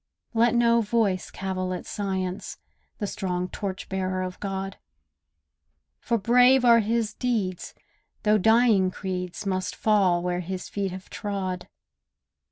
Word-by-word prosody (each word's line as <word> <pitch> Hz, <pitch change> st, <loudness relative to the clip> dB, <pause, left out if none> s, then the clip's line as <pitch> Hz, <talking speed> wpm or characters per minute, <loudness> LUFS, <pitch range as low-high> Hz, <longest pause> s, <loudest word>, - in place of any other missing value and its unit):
Let 235 Hz, +1 st, +3 dB
no 235 Hz, 0 st, +4 dB
voice 210 Hz, -4 st, 0 dB
cavil 185 Hz, -1 st, -3 dB
at 180 Hz, -, -7 dB
Science— 190 Hz, -2 st, -3 dB, 0.4 s
The 210 Hz, -, -2 dB
strong 180 Hz, -3 st, -3 dB
torch 190 Hz, -2 st, -5 dB
bearer 185 Hz, -1 st, -2 dB
of 185 Hz, 0 st, -6 dB
God; 195 Hz, -1 st, -4 dB, 1.2 s
For 235 Hz, -, 0 dB
brave 250 Hz, +4 st, +5 dB
are 235 Hz, -1 st, +7 dB
his 225 Hz, 0 st, 0 dB
deeds, 215 Hz, -9 st, -2 dB, 0.5 s
though 210 Hz, 0 st, +4 dB
dying 220 Hz, -2 st, +4 dB
creeds, 185 Hz, 0 st, -5 dB
Must 185 Hz, -1 st, -2 dB
fall 190 Hz, -5 st, +3 dB
where 180 Hz, 0 st, -1 dB
his 180 Hz, +1 st, -5 dB
feet 200 Hz, -1 st, -2 dB
have 185 Hz, +1 st, -9 dB
trod. 190 Hz, -3 st, -4 dB
195 Hz, 130 wpm, -26 LUFS, 185-225 Hz, 1.2 s, are